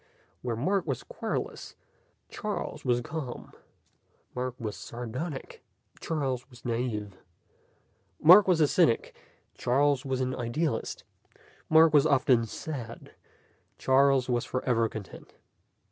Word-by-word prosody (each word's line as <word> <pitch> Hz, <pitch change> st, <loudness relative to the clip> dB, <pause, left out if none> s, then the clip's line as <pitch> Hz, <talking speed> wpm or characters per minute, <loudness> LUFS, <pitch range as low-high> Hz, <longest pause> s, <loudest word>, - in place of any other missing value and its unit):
Where 120 Hz, -2 st, -2 dB
Mark 180 Hz, -, 0 dB
was 135 Hz, -4 st, -2 dB
querulous, -, -, -5 dB, 0.5 s
Charles -, -, -5 dB
was 120 Hz, -1 st, +1 dB
calm. 140 Hz, -1 st, -6 dB, 0.8 s
Mark 125 Hz, 0 st, -3 dB
was 110 Hz, -4 st, -4 dB
sardonic, 125 Hz, -, -6 dB, 0.4 s
Charles 135 Hz, -5 st, -2 dB
was 120 Hz, -3 st, -17 dB
naive. 115 Hz, -5 st, -3 dB, 1.0 s
Mark 185 Hz, +6 st, +8 dB
was 180 Hz, -3 st, +3 dB
a 150 Hz, -, +5 dB
cynic, 155 Hz, -7 st, +2 dB, 0.4 s
Charles 140 Hz, +1 st, +1 dB
was 130 Hz, -1 st, -2 dB
an 130 Hz, 0 st, -1 dB
idealist. 120 Hz, +2 st, -2 dB, 0.7 s
Mark 160 Hz, 0 st, +6 dB
was 150 Hz, 0 st, +5 dB
often 130 Hz, -5 st, +3 dB
sad; 120 Hz, -2 st, -7 dB, 0.6 s
Charles 135 Hz, -1 st, +3 dB
was 120 Hz, -2 st, 0 dB
forever 120 Hz, -3 st, 0 dB
content. 105 Hz, -3 st, -10 dB
130 Hz, 110 wpm, -28 LUFS, 120-145 Hz, 1.0 s, Mark